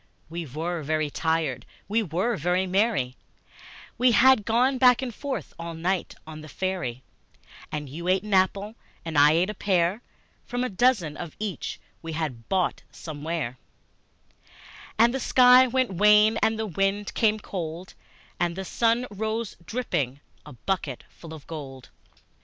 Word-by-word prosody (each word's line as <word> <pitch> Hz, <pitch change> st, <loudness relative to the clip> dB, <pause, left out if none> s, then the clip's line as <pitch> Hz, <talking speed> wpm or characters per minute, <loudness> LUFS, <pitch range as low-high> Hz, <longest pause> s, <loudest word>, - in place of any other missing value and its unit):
We 170 Hz, -1 st, -5 dB
were 165 Hz, +5 st, -3 dB
very 155 Hz, 0 st, -1 dB
tired, 160 Hz, -6 st, -1 dB, 0.2 s
we 220 Hz, +4 st, +1 dB
were 195 Hz, +5 st, -1 dB
very 180 Hz, +3 st, 0 dB
merry 190 Hz, -, 0 dB, 0.8 s
We 250 Hz, -1 st, +5 dB
had 260 Hz, -4 st, +5 dB
gone 250 Hz, +4 st, +2 dB
back 250 Hz, 0 st, +5 dB
and 245 Hz, -3 st, -4 dB
forth 280 Hz, +3 st, -5 dB
all 170 Hz, 0 st, -6 dB
night 175 Hz, +2 st, -2 dB
on 155 Hz, -1 st, -9 dB
the 155 Hz, -, -10 dB
ferry, 175 Hz, -9 st, -3 dB, 0.7 s
And 150 Hz, -1 st, -4 dB
you 165 Hz, +6 st, -7 dB
ate 185 Hz, +1 st, +2 dB
an 210 Hz, -1 st, -4 dB
apple, 195 Hz, +3 st, +2 dB, 0.3 s
and 165 Hz, -1 st, -5 dB
I 145 Hz, +1 st, +6 dB
ate 180 Hz, +5 st, +2 dB
a -, -, -7 dB
pear, 190 Hz, +1 st, +1 dB, 0.4 s
From 245 Hz, +1 st, -3 dB
a 255 Hz, -, -1 dB
dozen 195 Hz, -, +1 dB
of 170 Hz, -3 st, -7 dB
each 210 Hz, -3 st, -4 dB, 0.2 s
we 165 Hz, -1 st, -6 dB
had 140 Hz, -8 st, -4 dB
bought 185 Hz, -2 st, 0 dB
somewhere; 150 Hz, -4 st, -5 dB, 1.4 s
And 235 Hz, +2 st, +5 dB
the 265 Hz, -, -1 dB
sky 250 Hz, 0 st, +6 dB
went 255 Hz, -2 st, 0 dB
wan, 210 Hz, +3 st, +5 dB
and 220 Hz, 0 st, +2 dB
the 220 Hz, -, -2 dB
wind 195 Hz, +2 st, -1 dB
came 215 Hz, -1 st, +2 dB
cold, 175 Hz, -2 st, -6 dB, 0.5 s
And 175 Hz, -1 st, 0 dB
the 190 Hz, +1 st, -5 dB
sun 235 Hz, +4 st, +1 dB
rose 220 Hz, +2 st, -3 dB
dripping, 150 Hz, -, -2 dB, 0.3 s
a 150 Hz, -, -10 dB
bucketful 160 Hz, -, -5 dB
of 155 Hz, -3 st, -10 dB
gold. 135 Hz, -5 st, -8 dB
185 Hz, 150 wpm, -26 LUFS, 160-220 Hz, 1.4 s, I